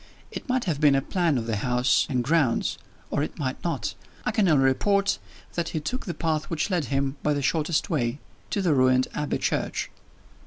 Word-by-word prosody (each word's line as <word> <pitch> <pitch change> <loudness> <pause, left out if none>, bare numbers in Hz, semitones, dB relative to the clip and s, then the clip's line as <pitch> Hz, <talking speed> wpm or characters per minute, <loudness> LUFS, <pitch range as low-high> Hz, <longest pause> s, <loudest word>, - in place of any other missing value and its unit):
It - - -7
might 255 -1 +1
have 160 -5 -2
been 145 -2 +6
a 135 - +3
plan 170 -6 +1
of 115 - -2
the 110 -2 -1
house 125 +3 +2
and 125 -3 +1
grounds, 145 -4 +1 0.3
or 145 - +1
it 150 - -3
might 130 -4 -3
not 170 - -2 0.3
I - - +1
can 210 -5 +2
only 150 -5 +4
report 200 +10 +2 0.3
that 170 -1 -1
he 155 - -2
took 225 - -4
the 175 - -3
path 155 -2 0
which 165 +4 -2
led 175 -5 +1
him, 135 +2 -1
by 150 -1 +1
the 140 - -2
shortest 155 +2 +1
way, 125 -5 0 0.3
to 200 - -1
the 170 -4 +3
ruined 130 -1 +4
Abbey 150 -1 -1
church. - - -1
150 Hz, 205 wpm, -26 LUFS, 130-170 Hz, 0.3 s, been